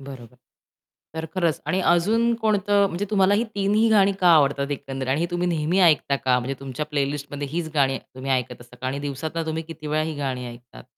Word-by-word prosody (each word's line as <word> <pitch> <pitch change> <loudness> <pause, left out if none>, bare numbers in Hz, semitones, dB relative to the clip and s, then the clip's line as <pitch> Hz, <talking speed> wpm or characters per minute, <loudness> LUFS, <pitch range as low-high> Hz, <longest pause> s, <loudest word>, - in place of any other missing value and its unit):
बरोबर. 130 -3 -11 0.8
तर 160 0 -4
खरंच 170 -6 0
आणि 185 - 0
अजून 225 +7 +3
कोणतं 205 -2 +2
म्हणजे 190 +1 -3
तुम्हाला 200 -1 +3
ही 225 - +1
तिन्ही 205 +3 +2
गाणी 200 -2 +5
का 180 - +5
आवडतात 140 -1 +2
एकंदरीत. 135 -2 -4
आणि 140 +4 +1
ही 170 - +1
तुम्ही 175 0 -1
नेहमी 165 +2 +1
ऐकता 155 -5 +4
का? 130 -2 +1
म्हणजे 125 +2 -3
तुमच्या 135 +2 -5
प्लेलिस्टमध्ये 145 -1 -3
हीच 165 +1 -2
गाणी 135 -2 +2
तुम्ही 130 +1 -8
ऐकत 125 -2 -2
असता 120 +1 -15
का? 130 - -6
आणि 135 +2 -2
दिवसातनं 150 +4 -4
तुम्ही 160 0 -2
किती 160 -1 -10
वेळा 155 +1 0
ही 155 -1 -4
गाणी 130 -3 -3
ऐकतात, 120 0 -13
150 Hz, 200 wpm, -23 LUFS, 135-180 Hz, 0.8 s, गाणी